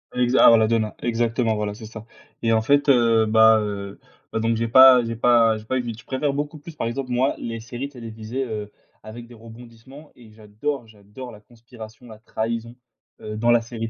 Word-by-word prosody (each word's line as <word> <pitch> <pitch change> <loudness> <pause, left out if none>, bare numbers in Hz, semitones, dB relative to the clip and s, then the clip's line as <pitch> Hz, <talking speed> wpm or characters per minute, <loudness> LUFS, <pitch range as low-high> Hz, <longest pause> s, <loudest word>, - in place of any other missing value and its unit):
Exa 125 +1 +3
ah, 115 - +8
la 110 -1 +2
Donna, 110 -2 -1
exactement, 115 -1 -1
voilà, 105 -1 -3
c'est 110 - -11
ça. 110 0 -11 0.4
Et, 115 -1 +1
en 110 - +2
fait, 145 +5 +2
heu 115 -3 +4
bah 110 0 +5
heu 100 -1 -6 0.3
bah, - - -2
donc, 115 +1 0
j'ai 115 +1 -2
pas 130 0 +7
j'ai 115 0 -4
pas 115 -2 +3
j'ai 110 - -12
pas 130 - -2
eu 120 -2 -4
je 115 - -16
préfère 140 +1 -2
beaucoup 145 +2 -5
plus, 160 +2 -12
par 115 - -3
exemple, 125 +1 -5
moi, 130 +3 +1
les 115 -1 -6
séries 120 +5 -7
télévisées, 115 0 -6
heu, 105 -3 -6 0.3
avec 115 +2 -10
des 120 - -15
rebondissements. 115 +5 -15
Et 115 -3 -17
j'adore 110 +4 -6
j'adore 110 +4 -12
la 105 - -15
conspiration, 120 0 -14
la 110 -1 -13
trahison, 115 +1 -5 0.4
heu, 105 0 -7
dans 120 +2 +1
la 120 - +5
série 115 -1 -6
115 Hz, 205 wpm, -22 LUFS, 110-125 Hz, 0.4 s, ah